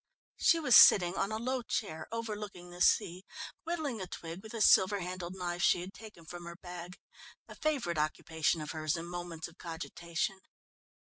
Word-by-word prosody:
She 335 - +4
was 255 -7 +5
sitting 175 -3 +8
on 200 - -1
a 215 - -1
low 255 +3 -1
chair 160 -8 -3
overlooking 210 -6 -5
the 175 0 -9
sea, 180 +2 +3 0.4
whittling 310 - -2
a 185 - -4
twig 170 +1 -7
with 220 +2 -9
a - - -3
silver 200 -1 +5
handled 180 0 -5
knife 175 -1 -3
she 175 - +4
had 185 +2 -8
taken 210 -6 -12
from 175 +2 -8
her 170 0 -7
bag 180 0 -9 0.5
a - - -10
favourite 255 - -1
occupation 155 +1 0
of 150 - -5
hers 155 -1 -1
in 165 - -5
moments 175 -2 -6
of 170 - -18
cogitation. 170 +2 -4
180 Hz, 180 wpm, -32 LUFS, 170-215 Hz, 0.5 s, sitting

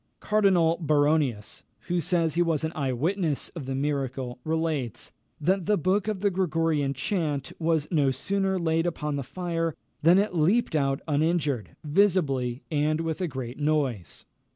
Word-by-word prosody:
Cardinal 185 -6 +3
Baronius, 145 -7 +1 0.2
who 175 0 -1
says 170 -3 +1
he 175 - +1
was 165 -3 +1
an 160 - -1
eye 140 -4 -1
witness 160 +3 -1
of 155 -7 -8
the 135 - -2
miracle, 135 -3 -2
relates, 160 -7 -2 0.3
that 185 +4 +1
the 210 -1 +3
book 185 +5 +1
of 210 -3 -2
the 200 -1 +2
Gregorian 165 -6 0
chant 150 - -2
was 160 -2 +1
no 145 -5 +3
sooner 190 +8 0
laid 165 -1 +1
upon 150 -3 -2
the 140 - -2
fire, 165 +2 -3 0.3
than 170 +4 +6
it 200 0 +1
leaped 180 +5 +2
out 135 -1 +1
uninjured, 145 - 0
visibly, 145 -7 +1
and 155 +1 +1
with 165 +2 -3
a 180 - 0
great 130 -3 -6
noise. 145 - -1
160 Hz, 155 wpm, -27 LUFS, 140-175 Hz, 0.3 s, than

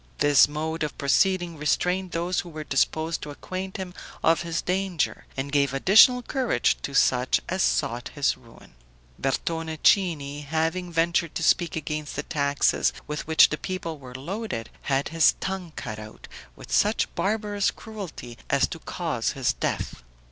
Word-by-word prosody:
This 145 -1 +6
mode 160 +2 -4
of 150 -1 -3
proceeding 175 +4 +2
restrained 180 +5 0
those 175 +2 -1
who 175 - -5
were 155 -1 -6
disposed 160 +3 0
to 150 - -6
acquaint 185 +6 -6
him 185 -2 -6 0.3
of 165 -1 +4
his 170 -1 -2
danger 185 -3 -1
and 135 +1 -3
gave 140 -2 +2
additional 220 - +6
courage 260 -1 +1
to 140 - -5
such 125 -1 +3
as 185 +1 -1
sought 125 -8 0
his 145 -2 +2
ruin. 120 - -18 0.5
Bertone 160 +4 -2
Cini, 150 -7 +2
having 160 +4 -1
ventured 170 0 +1
to - - -2
speak 175 -2 +2
against 150 -1 -4
the 150 - -2
taxes 140 -2 +1
with 150 0 -5
which 160 0 +6
the 150 - -3
people 170 -4 -4
were 125 -2 -11
loaded, 170 - -5
had 135 0 0
his 165 -1 +5
tongue 190 -3 -4
cut 110 0 -6
out 110 0 -11 0.3
with - - -12
such 210 +2 +2
barbarous 205 -1 0
cruelty 185 - -8
as - - +3
to - - -6
cause - - -2
his - - 0
death. - - -3
160 Hz, 160 wpm, -25 LUFS, 140-185 Hz, 0.5 s, This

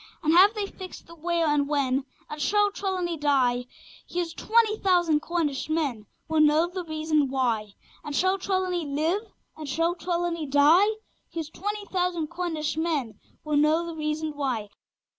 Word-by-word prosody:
And 310 +1 +3
have 390 +5 +7
they 420 -1 -1
fixed 375 -2 -10
the 335 - -13
where 335 +1 0
and 295 -2 +2
when? 270 -2 +1 0.2
And 300 0 -7
shall 415 +6 +3
Trelawny 370 -4 -2
die? 260 -4 +2 0.4
Here's 345 -2 -2
twenty 440 +1 +2
thousand 350 -5 +3
Cornish 310 -3 -2
men 280 -10 -1 0.2
Will 315 0 +1
know 305 +2 +5
the 360 +1 -5
reason 310 -3 0
why! 230 -6 -1 0.3
And 290 - -5
shall 375 +4 +2
Trelawny 370 -2 -1
live? 310 +7 0 0.3
Or 310 - -7
shall 330 +5 +1
Trelawny 345 -2 -2
die? 295 +8 +5 0.4
Here's 320 -2 -5
twenty 415 +3 -4
thousand 355 -5 -1
Cornish 315 -3 -2
men 295 -10 -1 0.2
Will 300 -1 0
know 310 +3 +3
the 335 - -5
reason 305 0 -2
why! 250 -7 -2
320 Hz, 160 wpm, -26 LUFS, 290-355 Hz, 0.4 s, have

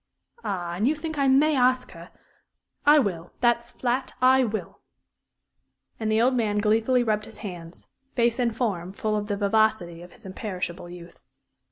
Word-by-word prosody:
Ah, 175 -3 -3
and 205 +7 0
you 300 - +2
think 315 0 -5
I 275 - +3
may 290 +3 +4
ask 255 0 +2
her? - - -12 0.8
I 295 +1 +8
will 180 - -1
that's 240 -1 +2
flat 255 +2 -2
I 260 +1 +5
will!" 220 -2 -4 1.2
And 220 -1 -1
the 220 - +3
old 250 +3 +3
man 220 -4 0
gleefully 225 +4 +2
rubbed 215 -2 0
his 220 - -12
hands, 175 -3 -9 0.3
face 235 0 +2
and 235 -2 0
form 190 -7 -2
full 215 +1 -2
of 205 -1 -2
the 205 -1 -2
vivacity 200 -4 +1
of 175 0 -13
his - - -18
imperishable 185 -3 -5
youth. 175 -1 -12
220 Hz, 170 wpm, -25 LUFS, 190-250 Hz, 1.2 s, I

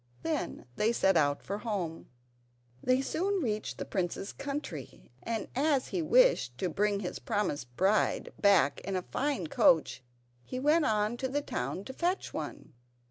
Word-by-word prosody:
Then 320 -3 -2
they 220 +2 +3
set 195 -5 +3
out 145 -3 +2
for 200 +1 -4
home. 195 -8 -4 0.7
They 255 +1 +3
soon 375 +8 -1
reached 215 -3 -2
the - - -4
prince's 185 +1 -3
country, 275 - -6
and 225 -2 -3
as 280 -1 +2
he 360 - -1
wished 455 - +4
to 180 - -1
bring 205 +4 +1
his 180 - -4
promised 145 -12 -2
bride 195 +3 +2
back 195 -8 +4
in 195 0 -3
a 185 - -1
fine 270 - -1
coach 150 -4 +3 0.4
he 255 - -5
went 300 +4 +3
on 215 +2 +1
to 260 - -1
the 285 +2 -1
town 140 - -3
to 260 - -7
fetch 355 +6 -1
one. - - -6
210 Hz, 160 wpm, -31 LUFS, 180-275 Hz, 0.7 s, wished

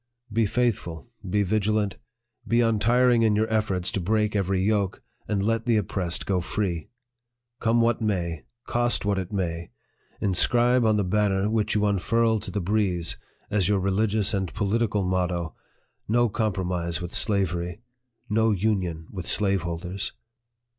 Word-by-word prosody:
Be 115 -1 +2
faithful, 115 -4 -1 0.2
be 105 +2 +2
vigilant, 105 0 0 0.5
be 115 +2 +3
untiring 120 +2 +3
in 110 -2 +3
your 110 +1 +2
efforts 95 -5 0
to - - -2
break 105 +3 0
every 95 -1 +1
yoke, 100 -2 0 0.2
and 100 -2 0
let 115 +2 0
the 115 -2 +4
oppressed 90 -4 -1
go 95 -2 +1
free. 85 -3 -2 0.7
Come 115 0 +2
what 115 0 +2
may 85 -7 -2 0.2
cost 120 -3 0
what 100 -1 +1
it 95 0 -5
may 85 -4 -3 0.5
inscribe 120 +5 +3
on 110 -1 +3
the 105 - +1
banner 100 +1 +1
which 105 -1 0
you 105 0 +2
unfurl 110 +3 +2
to 105 - -6
the 105 - -2
breeze, 90 -3 0 0.3
as 100 -3 +2
your 105 - +3
religious 100 +2 +1
and 95 -3 -1
political 105 0 0
motto 90 -2 -1 0.5
"No 120 +2 +3
COMPROMISE 90 -5 -1
WITH 90 -1 -6
SLAVERY! 95 -2 0 0.5
No 110 +1 +2
UNION 95 -6 0
WITH 90 -3 -6
SLAVEHOLDERS 95 0 -1
100 Hz, 145 wpm, -25 LUFS, 90-110 Hz, 0.7 s, the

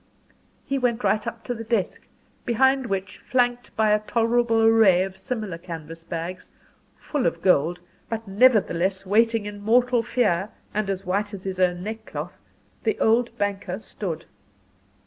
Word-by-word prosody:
He 275 0 -1
went 245 -1 0
right 215 0 +1
up 230 0 -5
to 245 - -3
the 225 -1 -6
desk, 220 -5 -2 0.4
behind 265 +2 +2
which, 195 -2 -3
flanked 245 -1 0
by 215 -1 +3
a 210 - +4
tolerable 230 +1 +1
array 220 -5 +6
of 190 0 -6
similar 215 -5 -5
canvas 165 -1 -8
bags, 170 +3 -6 0.5
full 290 - -1
of 165 0 -3
gold 175 -1 +3 0.3
but 225 -1 -4
nevertheless 195 -4 +3
waiting 225 +2 +2
in 205 0 -7
mortal 240 +3 +3
fear, 210 -5 +1 0.2
and 210 -1 -1
as 195 0 -3
white 200 +3 -1
as 190 - -10
his 190 -1 -4
own 180 -1 +1
neck 220 +2 -6
cloth - - -6 0.4
the 435 - 0
old 230 +1 +2
banker 200 -3 -2
stood. 185 -6 -6
210 Hz, 155 wpm, -24 LUFS, 185-235 Hz, 0.5 s, array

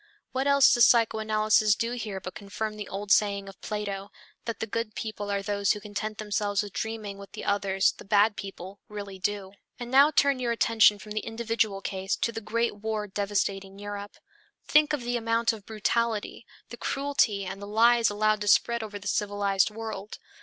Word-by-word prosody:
What 265 +2 -1
else 280 -1 +6
does 240 -2 +6
psychoanalysis 215 -2 +3
do 230 +3 -2
here 220 -5 -4
but 185 -1 -7
confirm 215 +1 -5
the 210 -2 -7
old 200 +1 -5
saying 200 -1 +3
of 195 - -12
Plato, 200 -2 -4 0.4
that 230 -3 -4
the - - -2
good 225 0 -4
people 210 -2 -5
are 200 -1 -1
those 200 0 +1
who 210 - -6
content 210 +1 -5
themselves 205 -1 -1
with 205 -2 -9
dreaming 215 -3 -4
what 200 - -12
the - - -7
others, 195 -1 +2
the - - -13
bad 205 +1 +3
people, 195 -1 -8
really 200 -2 -7
do? 200 0 -2 0.3
And 240 0 -6
now 275 +3 +7
turn 280 -3 +3
your 240 -2 0
attention 225 -2 +4
from 210 +1 -12
the 215 - -1
individual 225 -3 -1
case 190 -1 -2
to 230 - -1
the 225 - -6
great 230 0 -1
war 215 0 -3
devastating 195 -1 -2
Europe. 205 0 -7 0.5
Think 300 0 +4
of 295 -3 -1
the 240 0 -1
amount 230 0 +1
of 210 -3 -11
brutality, 225 +1 -1 0.2
the 240 - -8
cruelty 275 -9 0
and 195 +2 -6
the 200 - -7
lies 230 +2 +4
allowed 215 +1 +1
to 205 - -3
spread 235 +3 +3
over 210 -2 -6
the 205 0 -9
civilized 200 -1 +1
world. 215 -2 -7
210 Hz, 190 wpm, -27 LUFS, 200-230 Hz, 0.5 s, now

